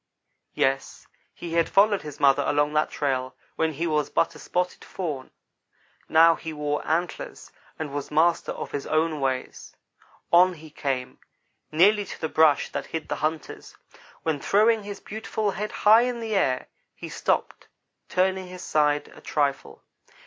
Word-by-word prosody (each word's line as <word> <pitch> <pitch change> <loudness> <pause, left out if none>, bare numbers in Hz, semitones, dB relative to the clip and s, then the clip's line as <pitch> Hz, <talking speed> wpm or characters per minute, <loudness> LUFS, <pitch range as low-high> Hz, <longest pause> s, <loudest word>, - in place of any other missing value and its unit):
Yes, 135 0 -1 0.3
he 170 -1 -8
had 170 -1 +2
followed 205 0 +4
his 150 -1 -9
mother 140 0 +4
along 145 +1 +1
that 150 0 +2
trail 130 -3 -2 0.2
when 160 -1 0
he 160 +4 -2
was 150 -3 0
but 165 - +1
a 150 - -13
spotted 180 +3 -2
fawn 150 -8 -5 0.8
now 165 +1 +7
he 160 0 -7
wore 150 -1 -2
antlers, 170 +3 -3 0.3
and 150 -3 -5
was 145 -1 -4
master 165 +3 +2
of - - -6
his 140 - -4
own 155 0 +1
ways. 130 -1 -3 0.6
On 180 +2 +6
he 155 -1 -13
came 135 -4 -3 0.5
nearly 200 +7 +4
to - - -9
the 160 - -2
brush 155 -2 +3
that - - -4
hid 160 -1 -5
the - - -2
hunters, 155 +1 -4 0.5
when, 160 -3 -1
throwing 215 +7 +3
his 205 -1 -7
beautiful 215 -1 -3
head 210 +3 -4
high 220 +2 +6
in 245 -1 -1
the 225 -1 -4
air, 130 -10 +1 0.3
he - - -8
stopped, - - -2 0.4
turning 185 0 +1
his 180 0 -9
side 150 -1 +1
a - - -15
trifle. 140 -2 -2
160 Hz, 160 wpm, -25 LUFS, 145-185 Hz, 0.8 s, now